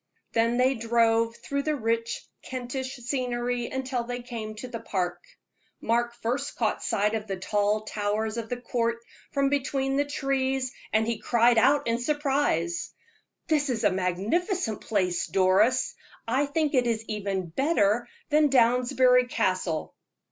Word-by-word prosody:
Then 230 Hz, +1 st, +2 dB
they 255 Hz, +2 st, +4 dB
drove 230 Hz, -1 st, +2 dB
through 280 Hz, +3 st, -3 dB
the 305 Hz, +1 st, 0 dB
rich 230 Hz, -2 st, -1 dB, 0.2 s
Kentish 260 Hz, +1 st, -5 dB
scenery 245 Hz, -1 st, -2 dB
until 260 Hz, -2 st, -2 dB
they 245 Hz, +1 st, -5 dB
came 225 Hz, -3 st, -6 dB
to 235 Hz, +4 st, -7 dB
the 235 Hz, -2 st, -6 dB
park. 180 Hz, -4 st, -2 dB, 0.6 s
Mark 235 Hz, +1 st, 0 dB
first 250 Hz, +4 st, -2 dB
caught 220 Hz, -3 st, 0 dB
sight 210 Hz, +1 st, +1 dB
of 220 Hz, -1 st, -3 dB
the 195 Hz, -1 st, -3 dB
tall 205 Hz, +3 st, +1 dB
towers 215 Hz, +1 st, -2 dB
of 225 Hz, -1 st, -4 dB
the 245 Hz, -, -2 dB
Court 235 Hz, -1 st, -1 dB, 0.3 s
from 275 Hz, -2 st, +2 dB
between 270 Hz, -1 st, 0 dB
the 285 Hz, -, +2 dB
trees, 270 Hz, -2 st, -1 dB, 0.2 s
and 220 Hz, +1 st, +3 dB
he 230 Hz, -1 st, -2 dB
cried 235 Hz, -1 st, +4 dB
out 280 Hz, +5 st, +4 dB
in 230 Hz, 0 st, 0 dB
surprise: 270 Hz, -, 0 dB, 0.5 s
"This 300 Hz, -3 st, +1 dB
is 235 Hz, -3 st, -1 dB
a 205 Hz, -, +4 dB
magnificent 210 Hz, -, -1 dB
place, 185 Hz, -5 st, 0 dB
Doris. 195 Hz, +7 st, +3 dB, 0.3 s
I 265 Hz, +5 st, +1 dB
think 305 Hz, +1 st, 0 dB
it 250 Hz, -3 st, +3 dB
is 225 Hz, -1 st, -1 dB
even 195 Hz, -4 st, -3 dB
better 240 Hz, -, +2 dB, 0.2 s
than 300 Hz, -1 st, +4 dB
Downsbury 250 Hz, 0 st, +4 dB
Castle." 185 Hz, -8 st, -1 dB
235 Hz, 150 wpm, -27 LUFS, 215-265 Hz, 0.6 s, they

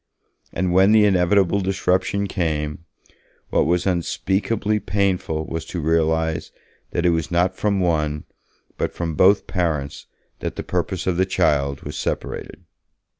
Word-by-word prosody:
And 90 Hz, 0 st, -1 dB
when 95 Hz, +3 st, +5 dB
the 110 Hz, -1 st, +6 dB
inevitable 95 Hz, 0 st, +3 dB
disruption 95 Hz, +1 st, 0 dB
came, 80 Hz, -4 st, -2 dB, 0.7 s
what -, -, +2 dB
was 90 Hz, +1 st, +1 dB
unspeakably 95 Hz, +4 st, 0 dB
painful 90 Hz, -5 st, -1 dB
was 80 Hz, 0 st, -4 dB
to 90 Hz, -, -5 dB
realize 80 Hz, 0 st, 0 dB, 0.4 s
that 85 Hz, -, -1 dB
it 85 Hz, -, +5 dB
was 80 Hz, -2 st, -1 dB
not 90 Hz, +1 st, +1 dB
from 100 Hz, -1 st, 0 dB
one, 75 Hz, -4 st, 0 dB, 0.6 s
but -, -, 0 dB
from 85 Hz, -2 st, -3 dB
both 95 Hz, +6 st, +4 dB
parents 80 Hz, -6 st, -2 dB, 0.3 s
that -, -, -4 dB
the -, -, -5 dB
purpose 90 Hz, +1 st, -2 dB
of 90 Hz, -2 st, 0 dB
the 95 Hz, -, +3 dB
child 70 Hz, -6 st, +1 dB
was -, -, -6 dB
separated. -, -, -4 dB
90 Hz, 140 wpm, -22 LUFS, 80-95 Hz, 0.7 s, the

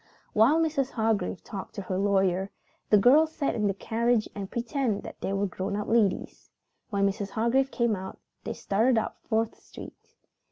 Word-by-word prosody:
While 240 Hz, +9 st, +5 dB
Mrs. 305 Hz, -5 st, +1 dB
Hargrave 220 Hz, -5 st, -1 dB
talked 195 Hz, -2 st, -8 dB
to 200 Hz, -, -5 dB
her 185 Hz, -, -3 dB
lawyer, 195 Hz, -1 st, +1 dB, 0.4 s
the 210 Hz, -, +6 dB
girls 295 Hz, +10 st, +5 dB
sat 280 Hz, -, 0 dB
in 210 Hz, -2 st, 0 dB
the 195 Hz, -, +1 dB
carriage 230 Hz, +2 st, 0 dB
and 195 Hz, -2 st, -6 dB
pretended 235 Hz, -2 st, -2 dB
that -, -, -10 dB
they -, -, -2 dB
were 195 Hz, +1 st, 0 dB
grown 190 Hz, +1 st, -3 dB
up 210 Hz, 0 st, -3 dB
ladies. 220 Hz, -5 st, 0 dB, 0.4 s
When 200 Hz, -3 st, +1 dB
Mrs. 195 Hz, 0 st, -3 dB
Hargrave 235 Hz, +6 st, +1 dB
came 235 Hz, -4 st, +1 dB
out, 190 Hz, 0 st, -7 dB, 0.3 s
they -, -, -4 dB
started 225 Hz, +5 st, +1 dB
up 220 Hz, -, -2 dB
Fourth 225 Hz, 0 st, 0 dB
Street. -, -, -13 dB
220 Hz, 175 wpm, -27 LUFS, 195-240 Hz, 0.4 s, the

